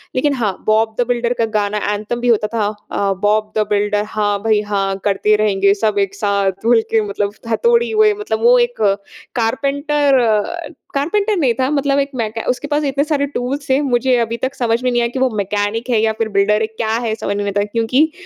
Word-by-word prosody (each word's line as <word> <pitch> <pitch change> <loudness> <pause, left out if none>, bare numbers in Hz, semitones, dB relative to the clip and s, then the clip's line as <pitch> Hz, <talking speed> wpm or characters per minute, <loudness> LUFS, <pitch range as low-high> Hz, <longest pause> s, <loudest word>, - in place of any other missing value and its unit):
लेकिन 280 +3 +1
हाँ, 215 -8 -1
Bob 220 0 +2
the 245 - +3
Builder 240 0 0
का 230 - +3
गाना 205 0 0 0.2
एंथम 215 +3 -4
भी 245 - -1
होता 215 -3 +3
था। 215 -3 +1 0.2
अ, 200 -1 0
बॉब 215 +1 +1
दा 215 - +3
बिल्डर, 205 0 +1
हाँ, 205 -1 -1
भई, 215 -2 +2
हाँ 195 -2 -1
करते 210 +1 +2
रहेंगे 200 -2 +2
सब 210 0 0
एक 195 0 -1
साथ 200 -1 -1
मिल 230 -1 +5
के 225 - +3
मतलब 200 0 -2
हा 225 - +1
तोडी 470 0 +3
हुए 430 -1 +4
मतलब 420 - -2
वो - - +6
एक 480 0 -1 0.5
कारपेंटर 280 +4 +1
अ, 235 +9 0 0.3
कारपेंटर 400 +9 0
नहीं 265 -7 +2
था 260 0 +1
मतलब 280 -1 +1
एक 275 - 0
मैके 225 -2 -3
उसके 255 +3 -2
पास 295 +1 0
इतने 275 +1 +1
सारे 295 -2 0
टूल्स 275 +1 -4
थे। 265 +1 +3
मुझे 255 -1 +1
अभी 230 0 -1
तक 260 +2 -3
समझ 235 -1 0
में 255 - +2
नहीं 240 0 +1
आया 235 - +1
कि 260 - -5
वो 260 0 +3
मैकेनिक 205 +4 -2
है 230 -3 +3
या 220 0 +1
फिर 220 0 -2
बिल्डर 205 +2 +2
है, 220 - +1
क्या 220 0 -4 0.2
है, 220 - 0
समझ 200 -2 -3
में 205 - -2
नहीं - - -3
आता 205 +1 +1
क्योंकि 235 +8 +1
230 Hz, 225 wpm, -17 LUFS, 210-275 Hz, 0.5 s, वो